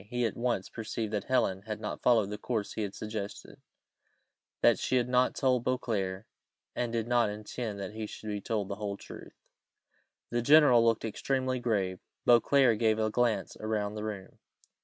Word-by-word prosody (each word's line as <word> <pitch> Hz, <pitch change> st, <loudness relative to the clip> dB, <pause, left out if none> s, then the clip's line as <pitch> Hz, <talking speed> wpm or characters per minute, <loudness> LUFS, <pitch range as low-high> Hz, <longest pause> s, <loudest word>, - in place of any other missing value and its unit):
He 125 Hz, 0 st, 0 dB
at 115 Hz, -, -2 dB
once 120 Hz, -5 st, -1 dB
perceived 110 Hz, -1 st, -4 dB
that 105 Hz, -, -1 dB
Helen 115 Hz, -7 st, +1 dB
had 110 Hz, -1 st, -4 dB
not -, -, -5 dB
followed 110 Hz, -5 st, +3 dB
the 105 Hz, -, -5 dB
course 110 Hz, -3 st, -2 dB
he -, -, -3 dB
had 100 Hz, -2 st, -4 dB
suggested; 105 Hz, -2 st, -6 dB, 1.0 s
that -, -, +5 dB
she -, -, 0 dB
had 125 Hz, -1 st, +2 dB
not 125 Hz, 0 st, +2 dB
told 130 Hz, -3 st, +2 dB
Beauclerc, 105 Hz, -6 st, -2 dB, 0.5 s
and 120 Hz, -1 st, -1 dB
did 115 Hz, -1 st, -1 dB
not 120 Hz, -3 st, +3 dB
intend 105 Hz, 0 st, -5 dB
that 100 Hz, +1 st, -5 dB
he 110 Hz, -1 st, -5 dB
should 110 Hz, -, -8 dB
be 105 Hz, -1 st, -3 dB
told 105 Hz, -3 st, -2 dB
the 100 Hz, -, -5 dB
whole 100 Hz, -1 st, -4 dB
truth. -, -, -11 dB, 1.0 s
The 120 Hz, 0 st, +1 dB
general 140 Hz, -3 st, +6 dB
looked 115 Hz, -1 st, +2 dB
extremely 130 Hz, +3 st, -1 dB
grave; 100 Hz, -6 st, -1 dB, 0.3 s
Beauclerc 120 Hz, -1 st, +5 dB
gave 110 Hz, -2 st, +3 dB
a 110 Hz, -1 st, 0 dB
glance 120 Hz, -1 st, 0 dB
round 105 Hz, -1 st, -2 dB
the 105 Hz, -, -4 dB
room. 105 Hz, -3 st, -6 dB
110 Hz, 180 wpm, -30 LUFS, 105-120 Hz, 1.0 s, general